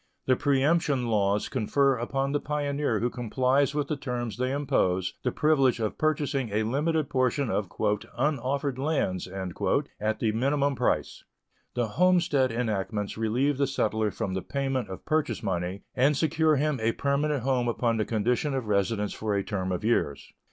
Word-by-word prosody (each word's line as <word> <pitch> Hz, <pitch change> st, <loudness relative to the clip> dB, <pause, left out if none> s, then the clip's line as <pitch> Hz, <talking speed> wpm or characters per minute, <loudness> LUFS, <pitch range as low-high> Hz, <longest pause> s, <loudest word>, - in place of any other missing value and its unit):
The 130 Hz, -, +4 dB
preemption 145 Hz, 0 st, +2 dB
laws 100 Hz, -1 st, +1 dB
confer 135 Hz, +3 st, +2 dB
upon 135 Hz, +3 st, -2 dB
the 145 Hz, -, +1 dB
pioneer 145 Hz, -6 st, -1 dB
who 120 Hz, -, +1 dB
complies 130 Hz, +4 st, +1 dB
with 145 Hz, -1 st, 0 dB
the 155 Hz, -, -1 dB
terms 120 Hz, -5 st, -4 dB
they 130 Hz, +1 st, 0 dB
impose 110 Hz, -11 st, 0 dB
the 125 Hz, -, 0 dB
privilege 135 Hz, -5 st, +3 dB
of 110 Hz, -2 st, -2 dB
purchasing 145 Hz, -5 st, 0 dB
a 105 Hz, +2 st, 0 dB
limited 150 Hz, +6 st, 0 dB
portion 130 Hz, -2 st, 0 dB
of 100 Hz, -4 st, -1 dB
"unoffered 130 Hz, +5 st, -1 dB
lands" 135 Hz, -, -1 dB
at 95 Hz, +3 st, -2 dB
the 110 Hz, -, +1 dB
minimum 140 Hz, +5 st, +1 dB
price. -, -, -1 dB, 0.5 s
The 120 Hz, -1 st, +1 dB
homestead 165 Hz, -, +3 dB
enactments 110 Hz, -3 st, -2 dB
relieve 125 Hz, +6 st, 0 dB
the 140 Hz, -, +3 dB
settler 110 Hz, -5 st, 0 dB
from 100 Hz, -3 st, -3 dB
the 95 Hz, -, -2 dB
payment 135 Hz, 0 st, -2 dB
of 95 Hz, -, -8 dB
purchase 155 Hz, -5 st, 0 dB
money, 95 Hz, 0 st, -2 dB
and 135 Hz, +3 st, +3 dB
secure 160 Hz, 0 st, +2 dB
him 145 Hz, -1 st, 0 dB
a 110 Hz, +1 st, +1 dB
permanent 140 Hz, -1 st, 0 dB
home 130 Hz, -2 st, +1 dB
upon 115 Hz, -1 st, 0 dB
the 110 Hz, -, +1 dB
condition 120 Hz, +6 st, 0 dB
of 130 Hz, -3 st, -2 dB
residence 105 Hz, 0 st, 0 dB
for 110 Hz, -2 st, -2 dB
a 100 Hz, -, 0 dB
term 95 Hz, -2 st, -3 dB
of 90 Hz, +1 st, -2 dB
years. 75 Hz, -11 st, 0 dB
125 Hz, 165 wpm, -27 LUFS, 110-140 Hz, 0.5 s, The